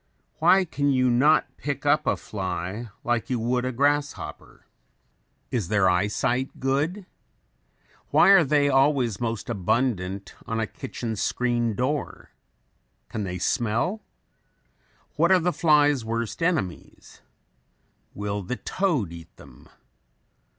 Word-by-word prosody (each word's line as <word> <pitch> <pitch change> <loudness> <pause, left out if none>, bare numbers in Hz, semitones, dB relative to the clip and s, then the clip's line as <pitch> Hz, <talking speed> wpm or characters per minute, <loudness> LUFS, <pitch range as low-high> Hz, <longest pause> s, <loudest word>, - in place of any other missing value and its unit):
Why 190 0 +5
can 145 -3 -1
you 130 -2 +3
not 140 +6 +3
pick 145 0 -4
up 150 +1 +2
a - - +2
fly 95 +3 -5
like 120 -2 -1
you 125 - 0
would 125 +2 0
a 130 - -1
grasshopper? 145 +3 -2 0.9
Is 115 -8 -1
their 100 -1 +3
eye 90 +2 +2
sight 130 +4 -2
good? 150 +9 -1 1.0
Why - - +5
are 195 -3 +8
they 145 0 +2
always 135 -5 +2
most 115 -5 -3
abundant 100 -2 -1
on 115 0 -2
a 110 - 0
kitchen 110 +1 -6
screen 120 +1 0
door? 135 +5 -3 0.8
Can 105 -2 -4
they 90 -1 -4
smell? 120 - -1 1.2
What 170 +4 +3
are 190 - +7
the 175 +1 0
fly's 145 -5 +3
worst 115 +5 -3
enemies? 155 - -3 0.9
Will 100 0 -3
the 100 +7 -4
toad 145 - -1
eat 85 0 -12
them? 65 -2 -16
125 Hz, 125 wpm, -25 LUFS, 105-145 Hz, 1.2 s, are